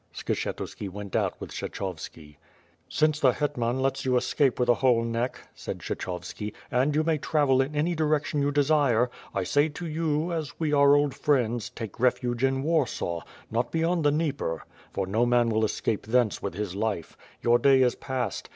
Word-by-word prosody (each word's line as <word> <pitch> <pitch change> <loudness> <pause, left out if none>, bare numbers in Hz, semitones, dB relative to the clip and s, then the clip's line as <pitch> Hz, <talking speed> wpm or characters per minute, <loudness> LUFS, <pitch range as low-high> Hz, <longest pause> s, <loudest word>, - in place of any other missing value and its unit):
Skshetuski 100 - -3
went 100 +1 -7
out - - 0
with - - -8
Kshechovski. 75 -2 -6 0.5
"Since 155 0 +2
the 130 -4 +4
hetman 125 -3 -1
lets 135 0 0
you 130 -1 +2
escape 135 +1 +1
with 125 - +2
a 120 - +6
whole 120 -2 +3
neck,'^ 115 +2 -3
said - - -6
Kshechovski, 90 +4 -5 0.2
"and 135 +4 +2
you 155 - +3
may 160 -1 +1
travel 140 -3 +2
in 140 +3 -3
any 160 +4 +1
direction 155 -2 0
you 140 +1 +1
desire, 140 -5 +3 0.2
1 95 -2 -1
say 145 - +3
to 165 +4 -7
you, 160 +1 -1
as 155 -4 -4
we 155 -2 0
are 140 0 +6
old 145 -1 +2
friends, 120 -5 0
take 115 -4 -8
refuge 125 0 +1
in 135 0 +2
Warsaw, 140 - 0 0.3
not 115 +2 0
beyond 165 +1 +1
the 145 - +5
Dnieper, 145 - -1 0.3
for 95 - -2
no 105 +5 +1
man 120 -1 +3
will 110 0 +1
escape 110 0 -1
thence 120 -2 +2
with 100 - -4
his 105 -3 -3
life. 105 -5 -2 0.3
Your 120 0 +4
day 135 +1 +5
is 125 - +3
past. 125 -7 -4
130 Hz, 180 wpm, -27 LUFS, 115-150 Hz, 0.5 s, a